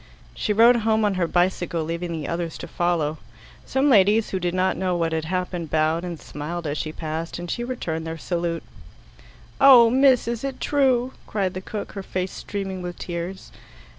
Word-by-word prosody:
She 215 - -2
rode 230 +3 +6
home 220 -1 +2
on 205 - +2
her 180 -2 0
bicycle, 175 -1 0
leaving 170 +2 -4
the 155 -3 -4
others 170 -1 -3
to - - -7
follow. 165 -4 0 0.5
Some 265 +2 +1
ladies 210 -3 +4
who 190 - -1
did 175 0 -1
not 185 0 +2
know 185 -2 -1
what 165 -1 0
had 160 -1 -1
happened 180 -1 -3
bowed 160 +2 +1
and 175 -3 -5
smiled 165 +3 -6
as 145 0 -2
she 155 - -3
passed, 160 +1 -5
and 175 0 -5
she 240 - -2
returned 165 -10 -4
their 160 0 -4
salute. 170 0 -2 1.0
"Oh, 240 -4 +8
miss, 260 -2 +4
is 235 0 -3
it 275 -1 -4
true?" 260 -3 +2
cried 195 -3 -1
the 185 - -5
cook, 205 +2 -6
her 195 - -6
face 185 -1 -3
streaming 195 -2 -5
with 175 -1 -6
tears. 175 +2 -6
180 Hz, 190 wpm, -24 LUFS, 165-215 Hz, 1.0 s, Oh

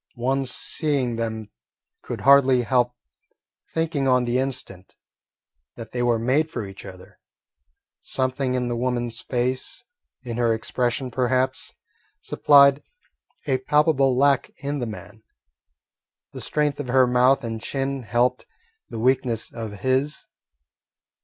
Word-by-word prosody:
One 135 +2 -1
seeing 130 -2 -1
them 110 -2 -4 0.5
could - - -6
hardly 135 -2 +5
help 125 +1 +1 0.8
thinking 160 -4 -1
on 125 -1 +3
the 120 +1 0
instant 125 -8 -5 0.8
that 115 -2 -9
they 120 - -3
were 120 -1 +2
made 135 +7 +1
for 120 -9 -5
each 95 +1 -11
other. 95 -1 -13 0.8
Something 130 0 -1
in 125 -1 -1
the 120 - -2
woman's 120 -1 -2
face, 125 +1 -3 0.4
in 120 -2 -5
her 115 -2 +2
expression 125 +3 -2
perhaps, 130 +1 -1 0.4
supplied 140 -1 +5 0.6
a 130 -3 +1
palpable 140 -2 +2
lack 140 0 +3
in 145 +1 -4
the 120 - -3
man. 110 0 -10 1.1
The - - -7
strength 150 -1 -1
of 145 - -4
her 130 +1 +4
mouth 125 +2 +3
and 115 -1 -4
chin 135 +2 -3
helped 120 +3 0 0.4
the - - -7
weakness 125 -1 0
of 110 -4 -7
his. 130 +4 0
125 Hz, 125 wpm, -23 LUFS, 120-135 Hz, 1.1 s, hardly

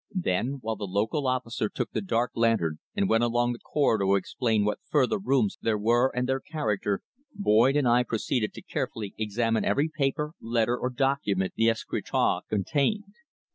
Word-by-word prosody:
Then, 135 - 0
while 110 0 -2
the 100 - -4
local 110 +9 0
officer 120 -4 -1
took - - -4
the 110 - -2
dark 115 +5 0
lantern 110 -10 +1 0.2
and 200 -1 +1
went 115 -5 +3
along 120 +1 +1
the 120 - -9
corridor 115 -9 +1
to 95 +1 +3
explore 110 +4 0
what 105 - -1
further 145 +7 +2
rooms 135 - +1
there 110 -2 +1
were, 120 +5 +3
and 125 0 0
their 135 0 0
character, 105 - -2 0.3
Boyd 130 - +4
and 145 -4 +2
I 120 +1 +5
proceeded 115 -1 -1
to - - -9
carefully 105 -3 -4
examine 110 +1 0
every 150 +3 +1
paper, 150 +1 0
letter 115 +1 +1
or 125 - -2
document 125 -8 0
the 115 0 +3
escritoire 115 - 0
contained. 150 - 0
120 Hz, 175 wpm, -27 LUFS, 110-135 Hz, 0.3 s, I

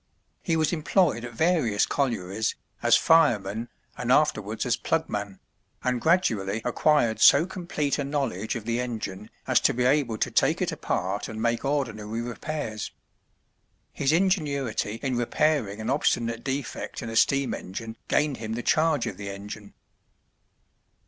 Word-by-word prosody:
He 165 - 0
was 155 +1 +1
employed 160 - +2
at 120 -1 -7
various 150 - +2
collieries, 110 -6 -1 0.3
as - - +5
fireman, 115 -8 +3 0.3
and - - -2
afterwards - - +2
as - - +2
plugman, 100 -2 -2 0.5
and 125 -2 0
gradually 110 - +2
acquired 125 -2 +2
so 145 +4 +7
complete 170 -6 -2
a - - 0
knowledge 135 -8 -2
of 115 -3 -5
the 115 +1 -1
engine 105 -4 -5 0.2
as - - +4
to - - +2
be 125 - +1
able 130 -4 +2
to - - -1
take - - +2
it - - 0
apart 95 +3 -2
and 110 -1 -6
make 115 +1 0
ordinary 115 -6 -2
repairs. 120 -2 -4 1.0
His 140 0 +1
ingenuity 150 - 0
in 130 -3 0
repairing 120 -4 +1
an 110 - -2
obstinate 115 -4 0
defect 135 -1 -4
in 115 - -5
a - - -5
steam 140 +3 +3
engine 110 +4 -6
gained 145 -3 +1
him 110 0 -5
the 120 +1 -4
charge 155 -3 +2
of - - -5
the 100 -1 -6
engine. 100 +1 -8
120 Hz, 150 wpm, -26 LUFS, 110-145 Hz, 1.0 s, so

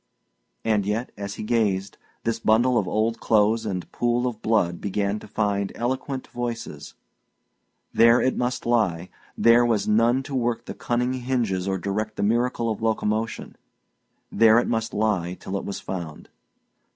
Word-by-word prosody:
And 110 -2 +2
yet, 105 +5 -2
as 100 0 -6
he - - -6
gazed, 105 -4 0 0.2
this 115 0 -1
bundle 120 +3 +3
of 100 -5 +1
old 110 +2 0
clothes 110 +1 +2
and 90 -3 -4
pool 120 +1 0
of 115 -3 -3
blood 95 -6 +1
began 100 +1 -1
to - - -12
find 100 -2 -1
eloquent 130 +2 -3
voices. 120 -11 -5 1.0
There 115 +1 +6
it 130 - +1
must 125 0 -2
lie; 95 -8 +1 0.3
there 115 +1 +6
was 115 -3 +1
none 115 +5 +3
to 140 - -8
work 120 -2 -1
the - - -6
cunning 125 +1 -1
hinges 120 -7 -1
or 95 0 0
direct 105 +3 -3
the - - -2
miracle 115 +1 +1
of 110 - -5
locomotion; 110 0 -1 0.7
there 110 +1 +5
it 120 - +2
must 115 -1 -1
lie 95 -5 0
till 95 - -5
it 100 - -3
was 100 - -4
found. 85 -5 -7
110 Hz, 160 wpm, -24 LUFS, 100-120 Hz, 1.0 s, There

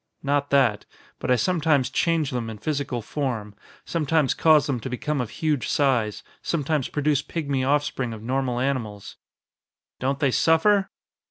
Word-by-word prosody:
"Not 145 0 0
that. 130 -7 +2 0.3
But - - -4
I 125 - +5
sometimes 150 0 +1
change 165 -4 +1
them 120 -3 -3
in 110 - -7
physical 140 -3 -3
form, 115 -7 -3 0.3
sometimes 155 -4 +1
cause 155 -3 +4
them 135 -4 -1
to 125 - -6
become 140 +3 -2
of 120 - -4
huge 150 0 -1
size, 125 -7 +1 0.2
sometimes 150 -3 -1
produce 145 -1 +1
pigmy 140 -4 -2
offspring 135 -3 0
of 110 -1 -8
normal 125 0 -1
animals." 120 -7 -3 0.8
"Don't 135 +2 0
they 140 -2 +1
suffer?" 195 +8 +3
140 Hz, 150 wpm, -24 LUFS, 125-150 Hz, 0.8 s, I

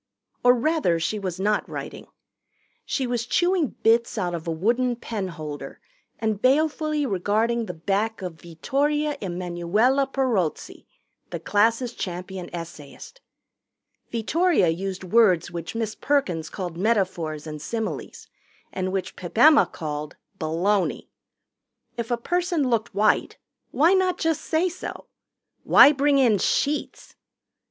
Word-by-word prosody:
Or 245 0 +6
rather 250 - +1
she 210 +6 -2
was 185 -2 -4
not 210 +2 0
writing. - - -7 0.8
She 265 - -1
was 240 -2 -2
chewing 350 -1 +1
bits 230 +1 +3
out 175 -1 -1
of 170 0 -5
a - - 0
wooden 240 +9 +1
pen 220 -4 -4
holder 155 -4 -7 0.4
and 220 -2 -2
balefully 305 +2 +2
regarding 220 +3 0
the - - -6
back 200 +5 -1
of 165 -4 -7
Vittoria 290 - -1
Emanuella 185 +9 0
Perozzi, 230 - -1 0.4
the - - -5
class' 230 +4 +1
champion 180 -1 -6
essayist. 165 - -9 0.9
Vittoria 280 - +2
used 190 +3 -3
words 185 -4 +3
which 170 +3 -6
Miss 225 -2 -2
Perkins 180 - -1
called 175 -4 -6
metaphors 180 -7 -1
and 150 -1 -7
similes 225 +7 -5 0.5
and 185 0 -2
which 190 -1 -3
Pip 180 +3 -9
Emma 300 +4 +7
called 150 -1 -6 0.2
baloney. 180 +5 0 0.9
If 235 -1 -4
a 240 - +1
person 345 +2 0
looked 230 -2 -1
white, 210 +1 +2 0.3
why 325 +6 +4
not 375 -1 +2
just 325 -2 0
say 325 +3 +1
so? 360 +1 -7 0.6
Why 285 - +8
bring 285 0 +2
in 235 -7 +4
sheets? 290 +9 -1
215 Hz, 130 wpm, -24 LUFS, 175-270 Hz, 0.9 s, Why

